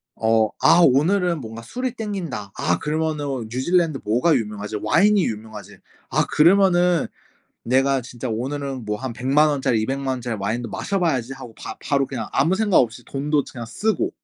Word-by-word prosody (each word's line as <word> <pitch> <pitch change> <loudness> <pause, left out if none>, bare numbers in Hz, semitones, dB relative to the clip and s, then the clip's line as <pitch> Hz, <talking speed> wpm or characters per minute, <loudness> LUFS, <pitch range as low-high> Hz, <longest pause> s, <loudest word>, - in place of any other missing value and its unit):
어 110 -1 +2
'아 175 - +6
오늘은 170 +5 +3
뭔가 115 -1 -8
술이 250 - -4
땡긴다. 180 - -5
아 85 0 0
그러면은 150 -5 -2
뉴질랜드 155 +3 +1
뭐가 125 +10 +2
유명하지? 105 -3 -3
와인이 200 - +3
유명하지. 110 -3 -6 0.3
아 - - +1
그러면은 180 0 +4 0.6
내가 135 +2 +2
진짜 120 +1 -7
오늘은 135 +2 -4
뭐 105 0 -2
한 130 +1 -5
1,000,000 135 +6 +2
원짜리 130 -6 +1
2,000,000 135 +4 -3
원짜리 120 -2 -4
와인도 115 +4 -2
마셔봐야지.' 155 - -1
하고 125 -4 -11
바 - - -7
바로 140 -2 +1
그냥 120 -5 -5
아무 160 +7 +2
생각 205 -1 +3
없이 120 0 0
돈도 145 +1 -1
그냥 120 -2 -7
쓰고 210 - -1
135 Hz, 340 characters per minute, -22 LUFS, 115-165 Hz, 0.6 s, 아